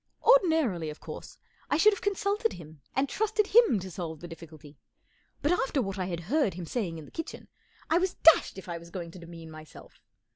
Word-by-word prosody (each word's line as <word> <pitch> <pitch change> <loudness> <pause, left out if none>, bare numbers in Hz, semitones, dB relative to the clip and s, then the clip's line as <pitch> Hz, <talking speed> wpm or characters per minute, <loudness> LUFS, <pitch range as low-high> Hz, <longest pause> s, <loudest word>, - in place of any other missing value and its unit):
Ordinarily, 320 - +4
of 150 - -8
course, - - -9 0.3
I 290 - +2
should 425 +6 +6
have 400 - -6
con¬ 405 -2 0
sulted 420 +2 0
him 155 -3 -12
and 270 +2 +2
trusted 425 +5 +1
to - - -13 0.2
him 230 -7 +1
to 190 0 -7
solve 165 -3 -5
the 175 - -8
difficulty; 155 -4 -12 0.6
but 295 - +3
after 280 -5 +1
what 195 -5 -2
I 185 - -1
had 170 -2 -4
heard 230 - +1
him 180 -1 -6
saying 175 -4 -3
in 155 - -9
the - - -16
kitchen, 325 - -7 0.4
I 330 - +3
was 370 0 -1
dashed 325 -10 +5
if 190 - -9
I 170 -1 -4
was 170 0 -13
going 170 -1 -6
to 180 - -11
demean 165 -1 -10
myself. 155 0 -13
190 Hz, 220 wpm, -29 LUFS, -, 0.6 s, should